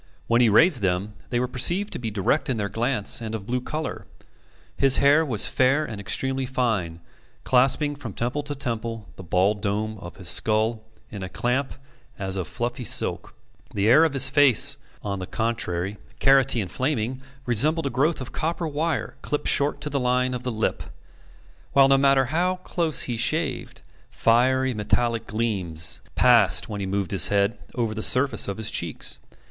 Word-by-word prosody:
When 120 Hz, +1 st, +2 dB
he 120 Hz, -, +4 dB
raised 140 Hz, -, +4 dB
them, 95 Hz, +2 st, -1 dB, 0.2 s
they 120 Hz, -, -1 dB
were 125 Hz, -, -1 dB
perceived 175 Hz, +12 st, 0 dB
to -, -, -4 dB
be 115 Hz, -2 st, -4 dB
direct 110 Hz, +9 st, -1 dB
in 125 Hz, -, 0 dB
their 100 Hz, -1 st, -2 dB
glance 115 Hz, +1 st, -1 dB
and 110 Hz, -1 st, -5 dB
of 100 Hz, -3 st, -7 dB
blue 125 Hz, +3 st, -2 dB
colour. 155 Hz, +5 st, -6 dB, 0.7 s
His 135 Hz, -1 st, +4 dB
hair 145 Hz, +3 st, +4 dB
was 115 Hz, -9 st, +1 dB
fair 135 Hz, +4 st, +1 dB
and 105 Hz, -3 st, -7 dB
extremely 130 Hz, +5 st, -2 dB
fine, 105 Hz, -11 st, -2 dB, 0.4 s
clasping 135 Hz, +3 st, +2 dB
from 130 Hz, -8 st, -8 dB
temple 120 Hz, +8 st, -2 dB
to 145 Hz, 0 st, -6 dB
temple 115 Hz, -5 st, -5 dB
the -, -, -10 dB
bald 95 Hz, +4 st, 0 dB
dome 110 Hz, +1 st, -3 dB
of 85 Hz, -2 st, -10 dB
his 95 Hz, -2 st, -5 dB
skull 110 Hz, +5 st, +2 dB, 0.3 s
in 100 Hz, -3 st, -7 dB
a 95 Hz, -, -6 dB
clamp 130 Hz, +7 st, -2 dB, 0.4 s
as 95 Hz, -1 st, -2 dB
of 95 Hz, -4 st, -4 dB
fluffy 120 Hz, +5 st, -4 dB
silk. -, -, +1 dB, 0.4 s
The 100 Hz, -, 0 dB
hair 130 Hz, +9 st, +6 dB
of 160 Hz, -3 st, +1 dB
his 135 Hz, -1 st, +7 dB
face, 140 Hz, 0 st, +4 dB, 0.2 s
on 100 Hz, -2 st, -4 dB
the 90 Hz, -, -6 dB
contrary, 100 Hz, -4 st, -3 dB, 0.2 s
carroty 135 Hz, -3 st, +4 dB
and 95 Hz, -, -6 dB
flaming, 130 Hz, -2 st, -2 dB, 0.2 s
resembled 150 Hz, +7 st, +3 dB
a 140 Hz, -, -2 dB
growth 145 Hz, +5 st, 0 dB
of 130 Hz, -, -7 dB
copper 165 Hz, +1 st, -3 dB
wire 155 Hz, +1 st, -3 dB
clipped 150 Hz, -, -2 dB
short 140 Hz, +1 st, +1 dB
to 150 Hz, -, -3 dB
the 140 Hz, -, -1 dB
line 125 Hz, 0 st, 0 dB
of 125 Hz, -, -4 dB
the 125 Hz, 0 st, -4 dB
lip; 110 Hz, -1 st, -2 dB, 0.9 s
while, 135 Hz, -1 st, +6 dB
no 135 Hz, 0 st, +4 dB
matter 135 Hz, -1 st, +3 dB
how 175 Hz, +7 st, 0 dB
close 165 Hz, -4 st, -2 dB
he 120 Hz, -2 st, -4 dB
shaved, 150 Hz, +4 st, -2 dB, 0.3 s
fiery 130 Hz, +3 st, +2 dB
metallic 115 Hz, +1 st, -1 dB
gleams 100 Hz, -8 st, -1 dB
passed, -, -, +4 dB
when 105 Hz, -1 st, -6 dB
he 95 Hz, -, -3 dB
moved 100 Hz, -1 st, -2 dB
his 95 Hz, -6 st, +2 dB
head, 100 Hz, +1 st, 0 dB, 0.2 s
over 115 Hz, -3 st, -1 dB
the 110 Hz, -, -5 dB
surface 125 Hz, 0 st, +3 dB
of 100 Hz, -, -4 dB
his 110 Hz, -1 st, -2 dB
cheeks. 85 Hz, -3 st, -2 dB
120 Hz, 180 wpm, -24 LUFS, 105-135 Hz, 0.9 s, his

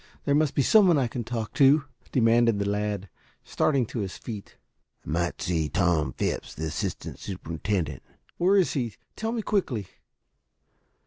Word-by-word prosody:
There 140 Hz, -, +2 dB
must 150 Hz, -1 st, +2 dB
be 140 Hz, -, +3 dB
some 210 Hz, -, +6 dB
one 175 Hz, -, +5 dB
that 140 Hz, -, +3 dB
I -, -, 0 dB
can 120 Hz, +1 st, -4 dB
talk 115 Hz, -2 st, -4 dB
to," 140 Hz, +2 st, +5 dB, 0.3 s
demanded 115 Hz, -2 st, +4 dB
the 100 Hz, 0 st, -1 dB
lad, 105 Hz, -1 st, -1 dB, 0.4 s
starting 135 Hz, -5 st, +1 dB
to 115 Hz, -, -5 dB
his 95 Hz, -3 st, -4 dB
feet. 105 Hz, -4 st, -8 dB, 0.5 s
"Might 85 Hz, +2 st, -1 dB
see 80 Hz, -4 st, 0 dB
Tom 80 Hz, -5 st, +1 dB
Phipps, -, -, -3 dB
the 80 Hz, -, -4 dB
assistant 90 Hz, +4 st, -4 dB
superintendent." 85 Hz, -4 st, -3 dB, 0.4 s
"Where 190 Hz, +3 st, +4 dB
is 185 Hz, -, +3 dB
he? 120 Hz, -7 st, -2 dB, 0.2 s
Tell 220 Hz, +1 st, -2 dB
me 230 Hz, -2 st, -2 dB
quickly." 140 Hz, -, 0 dB
110 Hz, 165 wpm, -27 LUFS, 90-140 Hz, 0.5 s, some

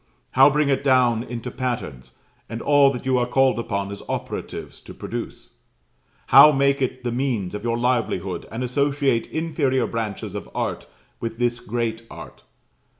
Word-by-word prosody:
how 135 Hz, +2 st, +7 dB
bring 150 Hz, 0 st, +1 dB
it 135 Hz, -1 st, +1 dB
down 125 Hz, -4 st, +3 dB
into 120 Hz, +1 st, -6 dB
patterns, 120 Hz, -, -5 dB, 0.3 s
and 115 Hz, -, -5 dB
all 145 Hz, +1 st, +5 dB
that 125 Hz, -2 st, -6 dB
you 130 Hz, -1 st, +2 dB
are 120 Hz, -, 0 dB
called 130 Hz, 0 st, +2 dB
upon 100 Hz, -3 st, -3 dB
as 100 Hz, -, -7 dB
operatives -, -, -5 dB
to -, -, -12 dB
produce? -, -, -7 dB, 0.7 s
how 150 Hz, -, +10 dB
make 140 Hz, 0 st, +2 dB
it 130 Hz, 0 st, -2 dB
the 120 Hz, -, -1 dB
means 120 Hz, -7 st, -1 dB
of 105 Hz, 0 st, -5 dB
your 115 Hz, 0 st, 0 dB
livelihood, 115 Hz, -7 st, -1 dB
and 115 Hz, +3 st, -4 dB
associate 140 Hz, -1 st, +1 dB
inferior 145 Hz, -5 st, 0 dB
branches 110 Hz, -3 st, -4 dB
of 105 Hz, -, -6 dB
art -, -, -3 dB, 0.3 s
with 115 Hz, -1 st, -5 dB
this 120 Hz, 0 st, 0 dB
great 115 Hz, -1 st, -3 dB
art? -, -, -11 dB
125 Hz, 160 wpm, -23 LUFS, 115-135 Hz, 0.7 s, how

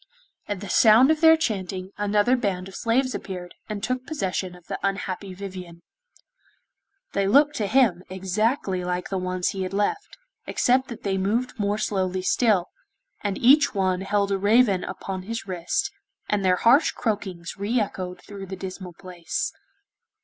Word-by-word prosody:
At 205 Hz, -2 st, -3 dB
the 205 Hz, -, -6 dB
sound 225 Hz, -, +6 dB
of 315 Hz, -, 0 dB
their 320 Hz, 0 st, +8 dB
chanting, 190 Hz, -, -3 dB
another 205 Hz, +4 st, +2 dB
band 195 Hz, -7 st, -2 dB
of 195 Hz, -, -11 dB
slaves 255 Hz, +5 st, +1 dB
appeared, 180 Hz, -2 st, -6 dB, 0.2 s
and 205 Hz, -2 st, -4 dB
took 255 Hz, +1 st, -1 dB
possession 190 Hz, -, -3 dB
of 180 Hz, -1 st, -17 dB
the -, -, -5 dB
unhappy 195 Hz, -1 st, -3 dB
Vivien. 180 Hz, -3 st, -8 dB, 1.3 s
They 200 Hz, 0 st, +1 dB
looked 290 Hz, +8 st, +5 dB
to 210 Hz, -, 0 dB
him 220 Hz, -7 st, +3 dB
exactly 190 Hz, +1 st, -1 dB
like 180 Hz, 0 st, -3 dB
the 195 Hz, -, -1 dB
ones 185 Hz, 0 st, -1 dB
he 195 Hz, -, -4 dB
had 185 Hz, +1 st, -3 dB
left, 210 Hz, -, -1 dB, 0.3 s
except 260 Hz, +2 st, +2 dB
that 235 Hz, -, -9 dB
they 195 Hz, -1 st, 0 dB
moved 230 Hz, +6 st, -1 dB
more 205 Hz, 0 st, 0 dB
slowly 185 Hz, -3 st, -1 dB
still, 200 Hz, -3 st, +2 dB, 0.5 s
and 200 Hz, -2 st, -1 dB
each 280 Hz, +1 st, +5 dB
one 185 Hz, -1 st, +1 dB
held 200 Hz, +1 st, 0 dB
a 195 Hz, -, +1 dB
raven 205 Hz, -1 st, +4 dB
upon 190 Hz, -1 st, -5 dB
his 230 Hz, +5 st, -5 dB
wrist, 175 Hz, -2 st, -1 dB, 0.4 s
and 205 Hz, -1 st, 0 dB
their 185 Hz, -1 st, +4 dB
harsh 245 Hz, -, +5 dB
croakings 190 Hz, -7 st, -3 dB
re 220 Hz, +5 st, +1 dB
echoed 185 Hz, -3 st, -4 dB
through 200 Hz, -2 st, -9 dB
the 190 Hz, -, -5 dB
dismal 185 Hz, -1 st, -7 dB
place. 180 Hz, -3 st, -4 dB
195 Hz, 165 wpm, -25 LUFS, 185-225 Hz, 1.3 s, their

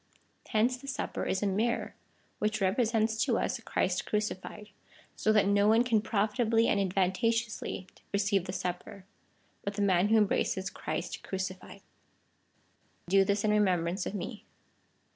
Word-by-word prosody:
Hence 235 Hz, +4 st, +2 dB
the 275 Hz, +2 st, -12 dB
Supper 265 Hz, -, -3 dB
is 190 Hz, -, -1 dB
a -, -, +2 dB
mirror 215 Hz, +5 st, 0 dB, 0.5 s
which 215 Hz, +1 st, 0 dB
represents 220 Hz, +2 st, +1 dB
to -, -, +1 dB
us -, -, -1 dB
Christ -, -, -1 dB
crucified, 210 Hz, 0 st, -3 dB, 0.5 s
so 215 Hz, -, +1 dB
that 210 Hz, -2 st, +4 dB
no 200 Hz, 0 st, +3 dB
one 225 Hz, +2 st, +5 dB
can 230 Hz, -4 st, +2 dB
profitably 225 Hz, +2 st, +1 dB
and 200 Hz, -, +2 dB
advantageously 195 Hz, +3 st, 0 dB, 0.3 s
receive 200 Hz, -2 st, +1 dB
the 185 Hz, -, -4 dB
supper, 185 Hz, +2 st, -5 dB, 0.6 s
but 200 Hz, 0 st, -3 dB
the 205 Hz, -, 0 dB
man 185 Hz, -1 st, +3 dB
who 220 Hz, +1 st, +4 dB
embraces 195 Hz, -2 st, +1 dB
Christ -, -, -4 dB
crucified. 190 Hz, +1 st, -5 dB, 1.3 s
Do 195 Hz, +1 st, +5 dB
this 200 Hz, +1 st, 0 dB
in 215 Hz, -, +2 dB
remembrance 185 Hz, -3 st, +1 dB
of -, -, -4 dB
me. 205 Hz, +4 st, -6 dB
205 Hz, 145 wpm, -30 LUFS, 190-220 Hz, 1.3 s, one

